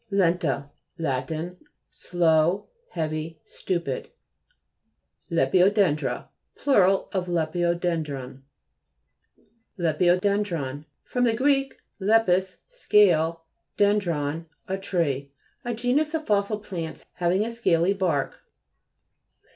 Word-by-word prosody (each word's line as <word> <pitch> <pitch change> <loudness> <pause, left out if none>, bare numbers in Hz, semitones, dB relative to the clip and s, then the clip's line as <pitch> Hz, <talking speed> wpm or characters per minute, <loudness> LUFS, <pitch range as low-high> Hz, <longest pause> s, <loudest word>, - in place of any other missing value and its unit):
LE'NTA 170 - +1 0.3
Lat. 130 -5 -2 0.6
Slow, 170 +1 +1 0.3
heavy, 155 0 -3
stupid. 170 -2 -3 1.2
LEPIDODE'NDBA 180 +2 +2 0.3
Plur. 265 -10 +4 0.3
of 185 -2 -2
lepidoden 175 0 0
dron. 135 -2 -7 1.4
LEPTDODE'NDBON 175 -3 +1 0.2
fr. 250 - -5
gr. 270 +3 +2 0.3
lepis, 190 -3 +3
scale, 175 - +3 0.3
dendrun, 170 -7 +1 0.2
a 190 - -1
tree. 155 -8 -1 0.3
A 240 -1 -3
genus 275 +7 +1
of 315 -1 -3
fossil 205 0 +1
plants, 175 -6 -6
having 180 +4 +1
a 230 - -4
scaly 190 -6 +2
bark. 175 -8 -1
175 Hz, 85 wpm, -25 LUFS, 160-205 Hz, 1.4 s, Plur